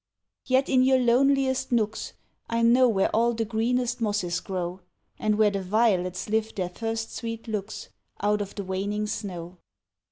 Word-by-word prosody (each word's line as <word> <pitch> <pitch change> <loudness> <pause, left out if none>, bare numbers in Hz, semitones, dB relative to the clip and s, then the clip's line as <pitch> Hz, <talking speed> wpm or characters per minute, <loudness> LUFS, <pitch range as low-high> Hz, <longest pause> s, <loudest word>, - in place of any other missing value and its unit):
Yet 260 +1 +3
in 260 -1 +4
your 260 0 +5
loneliest 260 +2 +2
nooks, 220 -2 -1 0.4
I 230 0 0
know 245 +2 +5
where 195 -4 +1
all 235 +1 +3
the 225 0 -1
greenest 235 +2 -1
mosses 205 -5 0
grow, 180 -1 -4 0.4
And 215 -1 +1
where 215 -1 +4
the 200 -1 -2
violets 185 -2 +1
lift 220 +1 -1
their 185 -3 -2
first 225 +4 -4
sweet 230 -1 -5
looks, 210 -1 -5 0.3
Out 210 +1 +1
of 200 - -6
the 200 - -4
waning 200 +3 -2
snow. 185 -5 -6
220 Hz, 160 wpm, -26 LUFS, 200-235 Hz, 0.4 s, your